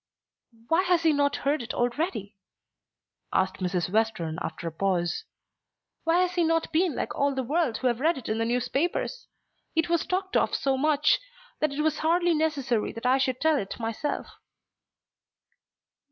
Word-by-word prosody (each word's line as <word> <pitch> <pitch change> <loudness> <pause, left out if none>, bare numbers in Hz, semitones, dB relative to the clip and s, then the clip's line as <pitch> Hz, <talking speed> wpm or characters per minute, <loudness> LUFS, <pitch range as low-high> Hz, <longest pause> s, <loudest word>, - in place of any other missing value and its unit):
"Why 330 +3 +4
has 355 -2 +2
he 320 -2 +4
not 285 0 +2
heard 285 0 +2
it 240 - -5
already?" 240 - -1 1.0
asked 190 0 +1
Mrs. 180 -2 -1
Western 195 -7 0
after 160 +1 -4
a - - -3
pause. 175 0 -1 0.8
"Why 335 +2 +4
has 360 -1 +1
he 350 - +2
not 330 0 +1
been 330 -3 +2
like - - -2
all 280 -1 +1
the 265 - -1
world 285 -3 0
who - - -6
have 240 -2 +2
read 320 +3 +2
it 260 - -8
in 220 +1 -1
the 225 - +1
newspapers? 275 - -1 0.5
It 325 +1 +1
was 340 -1 +1
talked 380 +2 -2
of - - +2
so 270 -1 +1
much, 300 +2 +3 0.4
that 305 -1 +1
it 285 +2 -2
was 310 -1 +1
hardly 345 +2 +3
necessary 285 -8 0
that 230 +2 -8
I 260 +2 +4
should 260 -1 0
tell 315 -2 +3
it 195 - -6
myself." 230 +6 -2
280 Hz, 170 wpm, -27 LUFS, 225-325 Hz, 1.0 s, Why